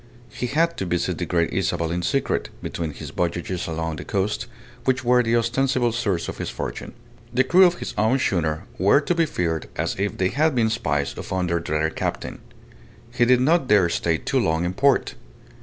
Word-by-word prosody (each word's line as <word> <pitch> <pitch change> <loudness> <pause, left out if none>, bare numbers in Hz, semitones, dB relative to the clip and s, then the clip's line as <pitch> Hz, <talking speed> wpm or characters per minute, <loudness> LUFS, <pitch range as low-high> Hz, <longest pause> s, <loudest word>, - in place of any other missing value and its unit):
He 125 - -3
had 165 +6 +1
to 95 - -2
visit 85 0 -1
the - - -2
Great 85 -1 0
Isabel 90 -3 0
in 90 +1 -1
secret, 135 +10 -1
between 85 -2 -3
his - - -8
voyages 85 +1 -2
along 80 -1 -3
the - - -6
coast, 100 +1 -2 0.4
which 130 0 +1
were 125 0 +4
the 115 -1 +1
ostensible 120 +1 +1
source 100 -7 -1
of - - -6
his - - -3
fortune. - - -6 0.4
The 125 +2 +3
crew 180 +8 +6
of 175 - 0
his - - -6
own 110 +5 +3
schooner 80 -10 0 0.2
were 100 +9 +5
to 155 +4 0
be 165 -2 +2
feared 85 - -2
as - - -1
if 100 +1 -1
they 95 0 +1
had 155 +3 +1
been 110 -2 +2
spies 70 -11 -1
upon 95 -1 -2
their 85 -1 0
dreaded 80 -1 -1
captain. - - -3 0.7
He 120 0 +3
did 125 0 +4
not 155 +1 +3
dare 100 -6 +4
stay 85 -1 0
too - - -1
long 80 +2 +1
in 90 - -2
port. 140 +6 +2
100 Hz, 200 wpm, -23 LUFS, 85-130 Hz, 0.7 s, crew